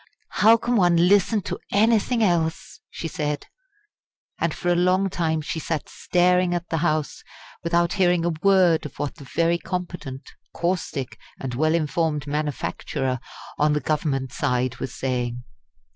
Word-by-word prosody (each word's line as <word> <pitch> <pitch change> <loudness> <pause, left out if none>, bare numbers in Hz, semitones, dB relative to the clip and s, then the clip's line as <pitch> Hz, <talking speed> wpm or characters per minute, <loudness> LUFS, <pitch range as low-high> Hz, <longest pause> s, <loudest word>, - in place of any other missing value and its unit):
"How 225 +2 +5
can 235 +1 0
one 175 -3 +4
listen 205 +2 +3
to - - -4
anything 225 +2 +3
else!" 165 -4 0
she 165 - -5
said; 150 -2 -3 0.9
and - - +1
for 175 - -3
a 175 - +4
long 185 +2 +2
time 160 -3 0
she 160 +2 -4
sat 160 -1 -3
staring 180 0 +2
at 175 0 -4
the 165 - 0
House 155 -2 -1 0.4
without 170 0 +1
hearing 180 -3 +2
a 175 - +1
word 185 -5 +4
of 140 - -18
what 145 - -4
the 140 - -11
very 170 +4 +1
competent, 175 -7 -5 0.3
caustic, 170 -6 -2 0.2
and 130 -2 -4
well 155 +6 +2
informed 155 -2 0
manufacturer 145 -2 -2 0.4
on 150 0 +3
the 150 - +1
Government 140 -4 -1
side 125 -4 0
was 125 - -5
saying. 125 -2 -2
165 Hz, 150 wpm, -24 LUFS, 145-180 Hz, 0.9 s, How